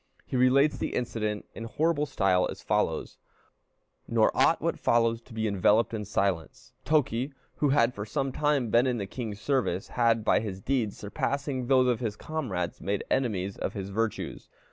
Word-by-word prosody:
He -, -, -5 dB
relates 135 Hz, +4 st, +4 dB
the -, -, -2 dB
incident 110 Hz, -3 st, -2 dB
in 115 Hz, -, -7 dB
horrible 150 Hz, +4 st, 0 dB
style 95 Hz, -6 st, +2 dB
as -, -, -8 dB
follows: -, -, -1 dB, 0.9 s
"Nor -, -, +2 dB
ought -, -, +4 dB
what -, -, -1 dB
follows 115 Hz, -1 st, +2 dB
to 120 Hz, -, -21 dB
be 110 Hz, -1 st, -1 dB
enveloped 105 Hz, +3 st, +3 dB
in 105 Hz, -2 st, -3 dB
silence. 95 Hz, -5 st, -2 dB
Toki, 140 Hz, -3 st, +1 dB, 0.2 s
who 145 Hz, -, +2 dB
had 125 Hz, -3 st, +3 dB
for 105 Hz, -, -5 dB
some 135 Hz, +2 st, -1 dB
time 145 Hz, -5 st, +1 dB
been 120 Hz, +3 st, +4 dB
in 125 Hz, -2 st, 0 dB
the 100 Hz, -, -3 dB
king's 105 Hz, 0 st, -6 dB
service, 110 Hz, -6 st, 0 dB
had, 115 Hz, -2 st, +2 dB
by -, -, +4 dB
his 100 Hz, -3 st, -5 dB
deeds, 115 Hz, -2 st, -1 dB
surpassing 130 Hz, +4 st, -2 dB
those 130 Hz, -1 st, +5 dB
of 120 Hz, -3 st, +1 dB
his 110 Hz, -4 st, -2 dB
comrades, 110 Hz, -, -4 dB
made 100 Hz, +1 st, -1 dB
enemies 100 Hz, -7 st, 0 dB
of -, -, -3 dB
his 100 Hz, -1 st, -5 dB
virtues. 110 Hz, +2 st, -3 dB
115 Hz, 175 wpm, -28 LUFS, 105-130 Hz, 0.9 s, those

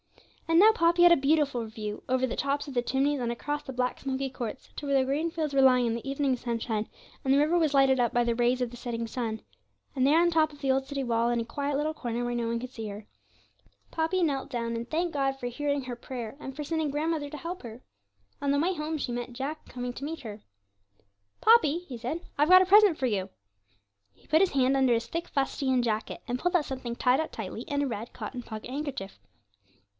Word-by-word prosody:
And 330 Hz, 0 st, +4 dB
now 430 Hz, +3 st, +8 dB
Poppy 345 Hz, -2 st, +3 dB
had 350 Hz, -, +8 dB
a -, -, +4 dB
beautiful 280 Hz, -4 st, +1 dB
view, 215 Hz, -1 st, -6 dB
over 260 Hz, 0 st, +2 dB
the -, -, -4 dB
tops 285 Hz, +1 st, -1 dB
of 280 Hz, -, -7 dB
the 245 Hz, -, +2 dB
chimneys, 270 Hz, +3 st, 0 dB
and 235 Hz, -1 st, -1 dB
across 290 Hz, +5 st, -3 dB
the -, -, -7 dB
black 250 Hz, 0 st, -1 dB
smoky 270 Hz, 0 st, -2 dB
courts, 255 Hz, -1 st, -6 dB
to -, -, -6 dB
where 280 Hz, -1 st, +2 dB
the 260 Hz, -, +3 dB
green 295 Hz, +5 st, 0 dB
fields 310 Hz, -3 st, -2 dB
were 275 Hz, -, +4 dB
lying 255 Hz, -2 st, +5 dB
in 230 Hz, -, 0 dB
the 235 Hz, +4 st, -5 dB
evening 275 Hz, -1 st, +1 dB
sunshine, 230 Hz, -3 st, -3 dB, 0.3 s
and 265 Hz, -, +1 dB
the -, -, +5 dB
river 305 Hz, +4 st, +3 dB
was 315 Hz, -4 st, +2 dB
lighted 270 Hz, -1 st, +4 dB
up 240 Hz, -, +2 dB
by 240 Hz, 0 st, +2 dB
the 235 Hz, -1 st, +1 dB
rays 245 Hz, +2 st, +2 dB
of 250 Hz, -, 0 dB
the 245 Hz, -, -11 dB
setting 235 Hz, -1 st, -4 dB
sun. 225 Hz, -2 st, -4 dB, 0.5 s
And 260 Hz, -1 st, +2 dB
there 300 Hz, +4 st, +5 dB
on 345 Hz, -, +4 dB
the 345 Hz, -, 0 dB
top 310 Hz, -1 st, +3 dB
of 290 Hz, -, -15 dB
the 270 Hz, -2 st, +1 dB
old 265 Hz, 0 st, 0 dB
city 275 Hz, -1 st, -3 dB
wall, 235 Hz, -1 st, +1 dB
in 240 Hz, 0 st, +1 dB
a 230 Hz, -, -2 dB
quiet 285 Hz, +3 st, -2 dB
little 305 Hz, +2 st, -1 dB
corner 245 Hz, -5 st, -3 dB
where 240 Hz, 0 st, -2 dB
no 235 Hz, -1 st, -1 dB
one 230 Hz, 0 st, -1 dB
could 255 Hz, +1 st, -7 dB
see 225 Hz, -4 st, -6 dB
her, 205 Hz, +1 st, -8 dB, 0.9 s
Poppy 330 Hz, +3 st, 0 dB
knelt 280 Hz, -4 st, -1 dB
down, 235 Hz, -3 st, -2 dB
and 230 Hz, +1 st, -5 dB
thanked 340 Hz, +2 st, -1 dB
God 270 Hz, -1 st, 0 dB
for 245 Hz, -, -3 dB
hearing 285 Hz, +3 st, -1 dB
her 250 Hz, -1 st, -5 dB
prayer, 240 Hz, -1 st, -7 dB
and 270 Hz, -2 st, -7 dB
for 300 Hz, -, -4 dB
sending 315 Hz, 0 st, -1 dB
grandmother 300 Hz, 0 st, -1 dB
to 300 Hz, -, -7 dB
help 345 Hz, +4 st, -6 dB
her. 235 Hz, 0 st, -10 dB, 0.6 s
On 280 Hz, -1 st, +1 dB
her 285 Hz, -, +2 dB
way 350 Hz, +5 st, +1 dB
home 310 Hz, -1 st, -3 dB
she 250 Hz, -4 st, -3 dB
met 240 Hz, 0 st, -4 dB
Jack 280 Hz, +5 st, -5 dB
coming 245 Hz, -1 st, -5 dB
to 260 Hz, -, -8 dB
meet 320 Hz, +3 st, -4 dB
her. 215 Hz, -4 st, -8 dB, 1.0 s
'Poppy,' 355 Hz, -7 st, +4 dB
he 250 Hz, -, -6 dB
said, 250 Hz, +9 st, -4 dB, 0.2 s
'I've 295 Hz, +3 st, +3 dB
got 370 Hz, 0 st, +9 dB
a -, -, -2 dB
present 400 Hz, -3 st, +6 dB
for 265 Hz, -, -1 dB
you.' 200 Hz, -5 st, -1 dB, 0.8 s
He -, -, -27 dB
put 315 Hz, +3 st, +4 dB
his 390 Hz, -, +3 dB
hand 270 Hz, -1 st, +3 dB
under 260 Hz, -3 st, +4 dB
his 230 Hz, 0 st, -2 dB
thick 335 Hz, +1 st, -4 dB
fustian 270 Hz, -2 st, 0 dB
jacket 220 Hz, -2 st, -2 dB
and 245 Hz, 0 st, -2 dB
pulled 355 Hz, +4 st, 0 dB
out 320 Hz, -4 st, +3 dB
something 255 Hz, -3 st, -5 dB
tied 250 Hz, +2 st, +3 dB
up 320 Hz, -, -5 dB
tightly -, -, -6 dB
in 285 Hz, -2 st, -1 dB
a -, -, 0 dB
red 225 Hz, -1 st, -5 dB
cotton 250 Hz, -, -6 dB
pocket 220 Hz, 0 st, -8 dB
handkerchief. 270 Hz, -8 st, -5 dB
270 Hz, 245 wpm, -28 LUFS, 240-300 Hz, 1.0 s, got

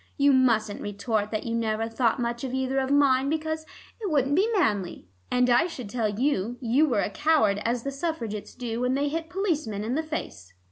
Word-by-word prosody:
You 285 Hz, -1 st, +5 dB
mustn't 230 Hz, -5 st, +2 dB
retort 205 Hz, +1 st, -2 dB
that 215 Hz, -1 st, -3 dB
you 230 Hz, -, -3 dB
never 225 Hz, -1 st, 0 dB
thought 230 Hz, +1 st, +1 dB
much 235 Hz, 0 st, -2 dB
of 260 Hz, -1 st, -3 dB
either 265 Hz, +1 st, 0 dB
of 265 Hz, 0 st, -1 dB
mine, 275 Hz, -1 st, +3 dB
because 315 Hz, 0 st, -2 dB, 0.3 s
it 410 Hz, -, -2 dB
wouldn't 280 Hz, -3 st, +2 dB
be 390 Hz, +8 st, +3 dB
manly, 205 Hz, -, 0 dB, 0.2 s
and 250 Hz, 0 st, +3 dB
I 245 Hz, +7 st, +4 dB
should 250 Hz, -, -8 dB
tell 225 Hz, -3 st, 0 dB
you 240 Hz, 0 st, -1 dB
you 265 Hz, +5 st, +3 dB
were 235 Hz, -7 st, +1 dB
a -, -, -2 dB
coward 255 Hz, -9 st, +2 dB
as 235 Hz, 0 st, 0 dB
the 275 Hz, -, -3 dB
Suffragettes 275 Hz, -8 st, -4 dB
do 235 Hz, -1 st, -4 dB
when 250 Hz, +1 st, +1 dB
they 285 Hz, +1 st, 0 dB
hit 325 Hz, +2 st, -4 dB
policemen 310 Hz, -, -1 dB
in 230 Hz, +3 st, -2 dB
the 310 Hz, -, +1 dB
face." 95 Hz, -, -6 dB
250 Hz, 205 wpm, -26 LUFS, 220-290 Hz, 0.3 s, You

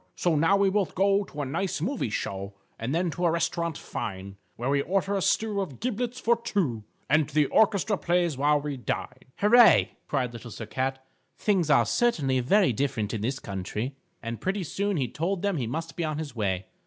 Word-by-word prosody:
So 175 Hz, -3 st, +1 dB
now 165 Hz, +6 st, +4 dB
we 200 Hz, -1 st, +3 dB
both 200 Hz, -2 st, 0 dB
go 195 Hz, +1 st, +3 dB
to 150 Hz, -4 st, -5 dB
a -, -, -3 dB
nice 180 Hz, +6 st, -2 dB
movie 215 Hz, -, -1 dB
show, 100 Hz, -1 st, -4 dB, 0.2 s
And 125 Hz, +6 st, -2 dB
then 175 Hz, 0 st, +1 dB
to 175 Hz, +3 st, -2 dB
a -, -, +4 dB
restaurant 170 Hz, -1 st, -1 dB
fine, 95 Hz, -1 st, -6 dB, 0.2 s
Where 125 Hz, +4 st, -2 dB
we 140 Hz, 0 st, +3 dB
order 195 Hz, +5 st, 0 dB
a 195 Hz, -, 0 dB
stew 210 Hz, +1 st, +1 dB
of 160 Hz, -10 st, -6 dB
giblets 245 Hz, +1 st, -2 dB
for 235 Hz, -1 st, +3 dB
two, 145 Hz, -, -1 dB, 0.2 s
And 150 Hz, +2 st, +3 dB
the 150 Hz, 0 st, +3 dB
orchestra 205 Hz, +3 st, +2 dB
plays 175 Hz, -3 st, +1 dB
while 145 Hz, +2 st, +3 dB
we 145 Hz, -1 st, -4 dB
dine._" 125 Hz, -, -4 dB
"Hurray!" 215 Hz, -2 st, +6 dB, 0.2 s
cried 125 Hz, -4 st, -1 dB
Little 120 Hz, 0 st, -8 dB
Sir 110 Hz, +1 st, -7 dB
Cat, 130 Hz, +4 st, -3 dB, 0.3 s
"things 190 Hz, -7 st, +1 dB
are 140 Hz, -, +5 dB
certainly 145 Hz, -, +1 dB
very 180 Hz, -, +3 dB
different 115 Hz, -4 st, -1 dB
in 110 Hz, -, -2 dB
this 130 Hz, +5 st, -1 dB
country." 105 Hz, +4 st, -4 dB, 0.3 s
And 115 Hz, 0 st, -5 dB
pretty 190 Hz, +1 st, -1 dB
soon 200 Hz, +3 st, -1 dB
he 130 Hz, -4 st, 0 dB
told 175 Hz, -, -2 dB
them 200 Hz, -4 st, +1 dB
he 125 Hz, -5 st, -2 dB
must 165 Hz, +7 st, -4 dB
be 170 Hz, -, -2 dB
on 155 Hz, -2 st, -2 dB
his 150 Hz, -5 st, -5 dB
way. 95 Hz, -4 st, -1 dB
155 Hz, 205 wpm, -27 LUFS, 125-195 Hz, 0.3 s, Hurray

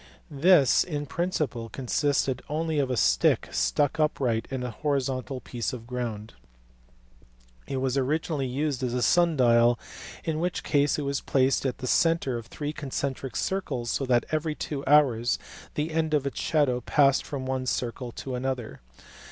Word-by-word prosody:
This, 150 Hz, -1 st, +5 dB
in 150 Hz, -4 st, -4 dB
principle, 145 Hz, -8 st, -2 dB
consisted 135 Hz, 0 st, 0 dB
only 155 Hz, 0 st, -1 dB
of 135 Hz, -2 st, +1 dB
a 125 Hz, -, -1 dB
stick -, -, +3 dB
stuck 145 Hz, +1 st, +1 dB
upright 125 Hz, -7 st, +1 dB
in 130 Hz, -2 st, -3 dB
a 125 Hz, -, -3 dB
horizontal 135 Hz, 0 st, -2 dB
piece 120 Hz, -1 st, -4 dB
of 115 Hz, -2 st, -7 dB
ground. 115 Hz, -3 st, -5 dB, 1.3 s
It 135 Hz, -, -3 dB
was 130 Hz, +1 st, 0 dB
originally 145 Hz, 0 st, -1 dB
used 140 Hz, +1 st, -2 dB
as 125 Hz, -1 st, -1 dB
a 125 Hz, -, 0 dB
sun 170 Hz, +4 st, +3 dB
dial, 120 Hz, -1 st, +5 dB, 0.5 s
in 155 Hz, -1 st, -2 dB
which 175 Hz, +1 st, -2 dB
case 145 Hz, -1 st, +2 dB
it 150 Hz, -, -2 dB
was 140 Hz, 0 st, -1 dB
placed 135 Hz, 0 st, +2 dB
at 125 Hz, -, -3 dB
the 130 Hz, -, -6 dB
centre 165 Hz, -1 st, +2 dB
of 115 Hz, -, -12 dB
three 150 Hz, +4 st, -5 dB
concentric 135 Hz, -2 st, -4 dB
circles 135 Hz, -12 st, -2 dB
so 135 Hz, -, -1 dB
that 120 Hz, -1 st, +3 dB
every 155 Hz, 0 st, -1 dB
two 140 Hz, -2 st, -4 dB
hours 130 Hz, -5 st, +4 dB, 0.4 s
the 150 Hz, +2 st, -1 dB
end 160 Hz, -1 st, +1 dB
of 140 Hz, -2 st, 0 dB
its 140 Hz, -, -3 dB
shadow 140 Hz, -6 st, +1 dB
passed 140 Hz, +2 st, +3 dB
from 135 Hz, -3 st, -5 dB
one 130 Hz, -1 st, -2 dB
circle 120 Hz, 0 st, -2 dB
to 130 Hz, -, -6 dB
another. 125 Hz, -, -3 dB
135 Hz, 165 wpm, -27 LUFS, 125-150 Hz, 1.3 s, This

